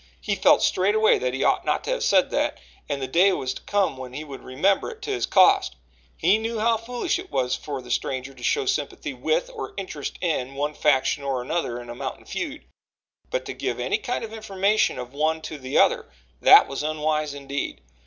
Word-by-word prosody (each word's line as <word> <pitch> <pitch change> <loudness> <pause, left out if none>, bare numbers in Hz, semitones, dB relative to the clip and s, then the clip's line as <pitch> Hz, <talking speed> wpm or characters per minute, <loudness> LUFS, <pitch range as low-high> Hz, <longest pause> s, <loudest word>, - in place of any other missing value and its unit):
He 210 - -2
felt 195 - +4
straightway 210 +4 +3
that 125 0 -1
he 135 - -1
ought - - +2
not - - 0
to - - -3
have - - -1
said - - +3
that, - - 0 0.3
and 140 -1 -1
the 130 - -3
day 185 +8 +4
was 130 -5 -2
to - - -10
come 200 -9 0
when 130 -1 -8
he 150 - -5
would 140 -3 -9
remember 185 +10 +1
it 445 -3 -11
to 420 - -3
his 390 - -1
cost. - - +4 0.4
He 215 - +3
knew 225 +1 -3
how 230 +1 +3
foolish 245 +10 -2
it 375 +1 -9
was 125 0 0
for 140 -4 -6
the 125 - -9
stranger 130 +2 -2
to 130 - -16
show 425 - +1
sympathy 390 0 -2
with, - - -1
or 445 - -7
interest 185 -7 -5
in, 135 -6 -2
one 145 +2 -1
faction 145 -2 +2
or 135 -3 -1
another 125 -4 -2
in 120 - -10
a 120 - -6
mountain 130 +2 -6
feud, 310 -4 -5 0.6
but - - -2
to - - -5
give - - -3
any - - 0
kind 245 -2 -3
of 225 -1 -7
information 210 -1 +1
of 125 0 -7
one 155 +2 +1
to 155 - -6
the 130 +1 -2
other - - +3 0.3
that - - +8
was 135 - -4
unwise 155 -1 -1
indeed. 140 0 -4
155 Hz, 215 wpm, -24 LUFS, 135-220 Hz, 0.6 s, that